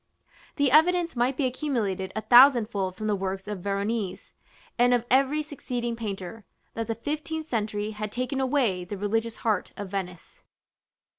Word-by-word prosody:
The 285 -3 +2
evidence 335 +2 +4
might 245 +2 +1
be 285 - +1
accumulated 230 -9 -2
a 220 - -1
thousandfold 235 -7 +5
from 215 - -6
the 210 -1 +1
works 195 0 -4
of 210 -2 -4
Veronese, 200 0 -3 0.5
and 245 0 +5
of 240 -1 -1
every 275 +4 +3
succeeding 245 -5 -4
painter, 210 -2 -6 0.3
that 225 0 -4
the 225 - -2
fifteenth 310 +5 -4
century 215 -4 -2
had 210 -1 -5
taken 255 +3 -2
away 250 -9 +1
the 195 +3 -6
religious 225 +3 -1
heart 215 -4 0
of 200 -2 -6
Venice. 180 -3 -6
225 Hz, 155 wpm, -26 LUFS, 200-260 Hz, 0.5 s, thousandfold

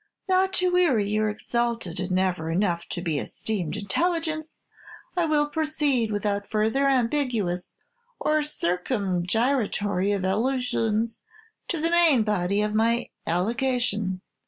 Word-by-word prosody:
"'Not 380 0 +3
to 365 0 +2
weary 305 - +3
your 215 +1 +1
exalted 230 -4 -2
and 185 - -2
never 185 -3 0
enough 170 -1 0
to 175 - -4
be 160 -5 0
esteemed 185 -3 -3
intelligence, 315 - -1 0.6
I 350 -2 +2
will 300 -2 +2
proceed, 295 -7 0
without 205 -1 -1
further 220 +6 +1
ambiguous 235 -9 0 0.4
or 305 0 +2
circumgyratory 205 - 0
evolutions, 225 +2 0 0.5
to 340 - -2
the 330 +2 0
main 330 -9 +5
body 200 -1 +1
of 210 0 -1
my 230 +2 +1 0.2
allegation. 210 0 0
220 Hz, 115 wpm, -25 LUFS, 190-280 Hz, 0.6 s, main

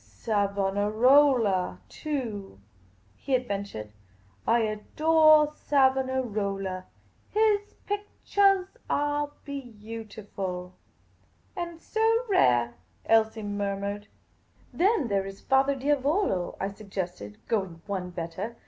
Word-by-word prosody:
" - - -27
Savonarola, 205 - +2
too," 225 - -5 0.6
he 270 - -1
adventured. 200 - -4 0.3
" 95 0 -32
I - - +2
adore 310 +8 +4
Savona 265 -3 +2
rola. 195 -4 -3 0.4
His 420 -1 +1
pickchahs 400 0 +1
are 290 0 0 0.2
beautiful." 215 -8 -6 0.4
" - - -37
And 340 -2 -5
so 450 +5 +1
rare! 120 - +3 0.2
" - - -37
Elsie 220 0 +3
murmured. 205 0 -3 0.7
"Then 375 - +2
there 195 -2 0
is 195 0 -11
Era 270 +1 +4
Diavolo? 280 - 0
" - - -28
I 195 - -1
suggested, 185 - -6
going 190 -7 -2
one 190 -3 -3
better. 180 +6 -5
220 Hz, 105 wpm, -27 LUFS, 195-290 Hz, 0.7 s, adore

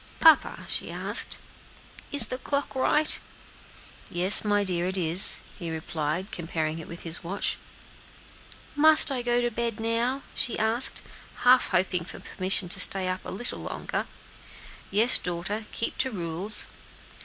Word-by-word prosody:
"Papa," 320 -2 +3
she - - 0
asked, - - -2 0.7
"is 285 -5 +8
the 255 +4 -7
clock 280 +2 -4
right?" 300 +3 +1 0.9
"Yes, 180 +3 +6
my 205 -1 0
dear, 180 -2 -2
it 190 +1 -4
is," 175 +1 +4 0.2
he 170 -3 -7
replied, 160 +3 -5
comparing 160 -1 -5
it 160 - -11
with 170 - -11
his 165 -1 -1
watch. 195 +4 -3 1.1
"And 290 - -6
must 310 -2 +7
I 255 -2 -3
go 240 0 -1
to 240 0 -2
bed 235 -1 -5
now?" 235 +4 -2
she 240 - 0
asked, 225 +4 0 0.4
half 250 +1 +4
hoping 180 -1 -1
for 170 - -11
permission 185 0 -2
to - - +3
stay 190 -1 +6
up 185 0 -5
a - - -8
little 240 +6 -3
longer. - - -6 0.8
"Yes, 220 +5 +4
daughter; 180 +5 -5
keep 230 - -5
to 260 - +1
rules." 185 0 +1
205 Hz, 150 wpm, -25 LUFS, 175-240 Hz, 1.1 s, is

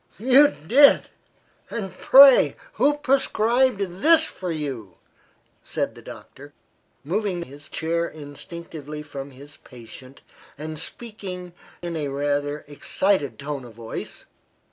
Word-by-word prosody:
"You 260 +6 +6 0.2
did! 280 - +5 0.6
and, 195 -4 -5
pray, 270 +4 +7 0.2
who 295 - +2
prescribed 255 -4 +1 0.2
this 325 0 +6
for 185 - -5
you?" 135 - -5 0.7
said - - -3
the - - -14
doctor, - - -12 0.5
moving 180 +2 -2
his 145 0 -13
chair 170 +1 -1
instinctively 150 0 -9
from 140 -2 -8
his 140 +3 -14
patient 125 +2 -14 0.4
and 155 +1 -6
speaking 185 -5 -7 0.3
in 170 -1 -4
a 150 -3 -2
rather 145 +1 -2
excited 150 +1 -1
tone 140 -1 -5
of 120 -3 -13
voice. 115 -1 -7
160 Hz, 115 wpm, -23 LUFS, 145-215 Hz, 0.7 s, pray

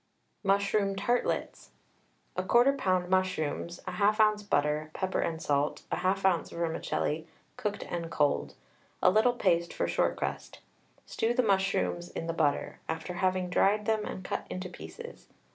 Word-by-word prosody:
MUSHROOM 200 0 +2
TARTLETS. 240 +5 -1 0.7
1/4 240 +9 +4
lb. 185 -8 +1
mushrooms, 175 -2 0
1/2 210 +1 +2
oz. 210 - -9
butter, 150 -5 0
pepper 190 0 -1
and 160 -1 -1
salt, 145 -1 0
1/2 190 +1 0
oz. 180 -3 +2
vermicelli, 160 -1 -2 0.3
cooked 205 -1 -3
and 170 -1 -4
cold, 150 -3 +1 0.5
a 180 - +7
little 220 +5 +4
paste 170 -7 +1
for - - -1
short - - +1
crust. - - -4 0.5
Stew 230 +2 -1
the 255 - +3
mushrooms 195 -4 +1
in - - -5
the 165 - -2
butter, 155 -3 0
after 160 +3 -3
having 185 0 0
dried 205 +3 +2
them 220 -1 +1
and 190 - -6
cut - - -4
into 185 0 -5
pieces. 470 - -10
185 Hz, 145 wpm, -30 LUFS, 170-205 Hz, 0.7 s, a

